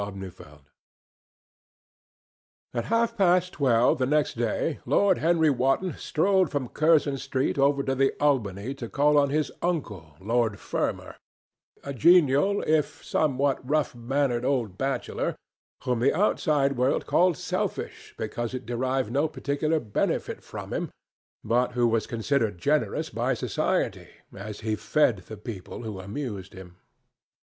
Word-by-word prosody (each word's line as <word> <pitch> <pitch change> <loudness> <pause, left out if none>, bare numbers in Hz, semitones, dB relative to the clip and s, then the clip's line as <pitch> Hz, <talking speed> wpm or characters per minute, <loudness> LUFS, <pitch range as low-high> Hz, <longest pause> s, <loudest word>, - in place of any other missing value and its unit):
CHAPTER 100 -1 -6
III. 90 - -11 2.3
At 120 -2 -2
half 230 0 +1
past 180 -3 +3
twelve 125 -4 +3
next 145 +4 +1
day 120 +6 -1
Lord 200 -3 +3
Henry 160 -2 +3
Wotton 135 +8 +1
strolled 190 +1 +1
from 135 -4 -3
Curzon 155 -3 +2
Street 135 0 -1
over 140 0 +3
to 135 - 0
the 135 +1 +2
Albany 125 -5 0
to 120 -4 -7
call 150 +1 +3
on 140 -1 +2
his 150 0 0
uncle, 105 - -3
Lord 110 +1 0
Fermor, - - -3 0.7
a 140 - -5
genial 170 - +4
if 155 -2 0
somewhat 140 -2 +1
rough 150 +3 0
mannered 120 0 -1
old 125 -8 0
bachelor, 135 +5 -2 0.5
whom 125 -2 0
the 125 - +2
outside 150 -8 +1
world 130 +3 +1
called 175 -2 +3
selfish - - -4
because 120 +3 -4
it 130 - -6
derived 130 0 -1
no 140 +5 +2
particular 155 +2 -1
benefit 110 -7 -2
from - - -8
him, - - -2 0.5
but 120 +3 +1
who 120 -1 +2
was 115 -1 0
considered 115 -3 0
generous 140 - 0
by - - 0
Society - - -1 0.3
as 105 +2 -7
he 110 0 -1
fed 125 -1 +2
the 110 - -8
people 105 +1 -8
who 105 -4 -6
amused 100 -1 -6
him. 90 -2 -12
135 Hz, 140 wpm, -26 LUFS, 115-150 Hz, 2.3 s, genial